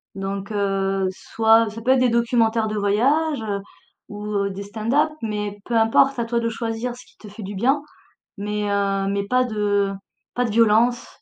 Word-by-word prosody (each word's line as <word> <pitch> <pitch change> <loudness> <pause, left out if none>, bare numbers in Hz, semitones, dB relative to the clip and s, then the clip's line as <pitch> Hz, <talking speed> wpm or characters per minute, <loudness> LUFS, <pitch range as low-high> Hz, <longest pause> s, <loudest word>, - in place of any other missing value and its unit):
donc, 195 +1 -4
heu, 195 -2 0
soit 225 +3 +2
ça 220 +2 -9
peut 250 +3 +2
être 265 - +4
des 255 -1 +3
documentaires 230 -1 +2
de 215 0 -3
voyages, 265 +9 +1
heu, 205 -2 -3 0.5
ou, 205 0 -7
heu, 200 -1 -1
des 195 +1 -6
stand-up, 225 +9 0
mais 210 -2 -3
peu 240 - -2
importe, 235 +4 +3
à 235 - 0
toi 235 +1 0
de 230 0 -1
choisir 230 +2 -3
ce 250 - -14
qui - - -25
te 210 - -12
fait 210 +2 -10
du 200 +1 -6
bien, 265 +8 +2 0.6
mais, 210 +1 -2
heu, 195 -1 0
mais 200 0 -2
pas 255 +3 +3
de 205 -4 0 0.4
pas 245 - 0
de - - -2
violence, 230 +2 +3
215 Hz, 195 wpm, -22 LUFS, 200-235 Hz, 0.6 s, être